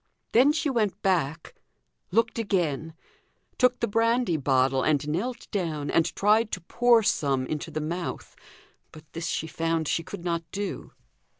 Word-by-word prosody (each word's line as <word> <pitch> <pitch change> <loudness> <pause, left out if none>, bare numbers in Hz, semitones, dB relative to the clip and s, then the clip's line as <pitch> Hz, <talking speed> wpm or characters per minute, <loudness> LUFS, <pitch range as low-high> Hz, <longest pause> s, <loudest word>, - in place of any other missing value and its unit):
Then 255 +6 +5
she 310 0 -1
went 215 -7 0
back 165 -5 0 0.6
looked 225 +4 +1
again; 165 -7 -1 0.6
took 250 -1 +3
the 235 - 0
brandy 230 -2 +2
bottle, 135 -2 +2
and 150 0 +1
knelt 215 +11 -3
down, 160 -8 -2
and 165 - +3
tried 215 +2 +3
to 185 - -3
pour 235 +6 +3
some 140 -8 +1
into 155 +3 -4
the 155 0 -4
mouth; 170 +3 -5 0.6
but 155 - -13
this 165 0 -4
she 160 - -2
found 165 0 -1
she 165 - 0
could 170 +1 -9
not 170 -1 0
do. 200 -1 -5
170 Hz, 155 wpm, -26 LUFS, 155-225 Hz, 0.6 s, Then